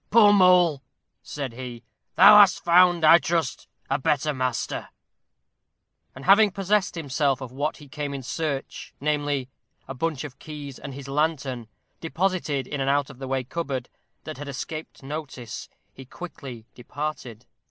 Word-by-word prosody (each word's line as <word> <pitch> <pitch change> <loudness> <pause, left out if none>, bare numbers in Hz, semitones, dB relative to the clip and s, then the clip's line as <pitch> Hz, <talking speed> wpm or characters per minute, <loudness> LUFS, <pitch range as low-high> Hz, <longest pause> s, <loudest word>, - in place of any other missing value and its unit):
"Poor 210 -2 +6
Mole!" 180 -6 +5 0.4
said 140 -5 -6
he, 120 -1 -8 0.3
"thou 210 - +9
hast 200 -3 +5
found, 175 -1 +5
I 165 +2 +8
trust, 160 -5 -2 0.2
a 135 - 0
better 150 +2 0
master." 130 -2 -3 1.3
And 130 - -10
having 205 +2 +6
possessed 195 +1 0
himself 140 -3 0
of 130 -3 -8
what 145 +4 -2
he 145 - -14
came 145 +1 -5
in 135 -1 -6
search 140 0 -4
namely, 145 -2 -1 0.4
a - - -5
bunch 150 +1 -2
of 145 -4 -9
keys 145 -4 -8
and 140 -1 -8
his 140 -1 -9
lantern, 135 -5 -1 0.3
deposited 165 -5 -1
in 140 +1 -4
an 135 - 0
out 140 0 +1
of 130 - -16
the 135 - -6
way 135 0 -1
cupboard, 135 -3 -4 0.3
that 155 -3 -8
had 145 - -7
escaped 155 +2 -7
notice, 135 -6 -7 0.2
he 135 - -11
quickly 130 -5 -9
departed. 125 -3 -6
145 Hz, 155 wpm, -25 LUFS, 130-165 Hz, 1.3 s, thou